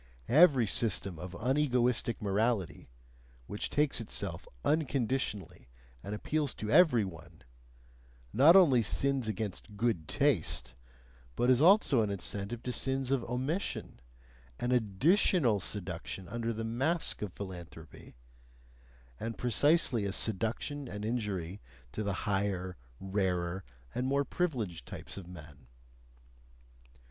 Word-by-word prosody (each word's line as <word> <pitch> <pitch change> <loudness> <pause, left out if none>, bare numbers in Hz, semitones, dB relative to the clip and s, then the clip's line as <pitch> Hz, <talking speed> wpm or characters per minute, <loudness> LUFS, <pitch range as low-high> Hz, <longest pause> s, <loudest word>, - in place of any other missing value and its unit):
Every 140 -3 +6
system 95 -5 0
of 90 +1 -7
unegoistic 125 - +1
morality 105 - 0 0.6
which 105 - -4
takes 145 -4 +1
itself 110 - -5 0.2
unconditionally 130 - -1 0.3
and 100 +2 -5
appeals 145 +5 -2
to 110 0 -4
every 150 - +5
one, 85 -4 -11 0.9
not 145 - +7
only 150 -11 +7
sins 125 +7 0
against 105 -1 -4
good 105 -9 0
taste, 60 -4 +1 0.6
but 125 +1 +3
is 125 +1 +4
also 170 - +5
an 105 - 0
incentive 100 +3 -4
to 125 - -2
sins 135 +1 0
of 135 -3 +1
omission, 130 - -3 0.6
an 120 - -1
ADDITIONAL 125 - +3
seduction 95 -1 -6
under 115 +1 -2
the 115 0 -4
mask 135 +9 -1
of 105 -4 -4
philanthropy 85 -8 -10 1.0
and 115 0 -4
precisely 125 -2 +2
a 100 - -1
seduction 115 +8 -2
and 105 -2 -6
injury 105 -5 -3 0.3
to 110 - -4
the 100 -1 -1
higher, 95 -3 -1 0.2
rarer, 95 -2 -1 0.3
and 125 - -1
more 140 +1 +1
privileged 115 - -2
types - - -8
of 95 -3 -8
men. 75 -6 -12
115 Hz, 115 wpm, -31 LUFS, 95-130 Hz, 1.0 s, not